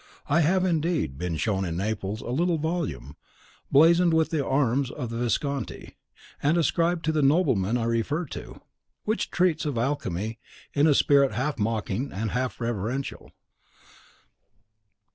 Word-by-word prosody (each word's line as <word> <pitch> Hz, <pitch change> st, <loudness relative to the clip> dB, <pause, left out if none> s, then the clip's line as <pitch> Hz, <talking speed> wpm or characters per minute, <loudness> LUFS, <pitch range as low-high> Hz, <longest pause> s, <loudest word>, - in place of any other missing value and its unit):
I 150 Hz, -, +3 dB
have, 185 Hz, +4 st, +2 dB
indeed, 160 Hz, -, 0 dB
been 90 Hz, -2 st, -2 dB
shown 95 Hz, +4 st, 0 dB
in 85 Hz, -2 st, -3 dB
Naples 105 Hz, +1 st, -3 dB
a -, -, -7 dB
little 170 Hz, +5 st, +1 dB
volume, 160 Hz, -, -3 dB, 0.5 s
blazoned 170 Hz, +3 st, +5 dB
with 160 Hz, -1 st, +2 dB
the 155 Hz, -4 st, 0 dB
arms 135 Hz, -1 st, +1 dB
of 125 Hz, -3 st, -5 dB
the 115 Hz, -, -4 dB
Visconti, 135 Hz, +4 st, -2 dB, 0.5 s
and 150 Hz, +4 st, +2 dB
ascribed 170 Hz, +1 st, +1 dB
to 160 Hz, -, +2 dB
the 155 Hz, -1 st, +1 dB
nobleman 130 Hz, -, +2 dB
I 120 Hz, -, -1 dB
refer 115 Hz, +9 st, 0 dB
to, -, -, -9 dB, 0.4 s
which 215 Hz, +1 st, -1 dB
treats 175 Hz, -3 st, +1 dB
of 145 Hz, -5 st, -2 dB
alchemy 115 Hz, -5 st, -2 dB, 0.3 s
in 145 Hz, +2 st, +4 dB
a 150 Hz, -, +4 dB
spirit 140 Hz, -4 st, +4 dB
half 130 Hz, +5 st, -2 dB
mocking 110 Hz, +3 st, -1 dB
and 105 Hz, +2 st, -3 dB
half 125 Hz, 0 st, -2 dB
reverential. 120 Hz, +3 st, -3 dB
135 Hz, 145 wpm, -26 LUFS, 115-160 Hz, 0.5 s, blazoned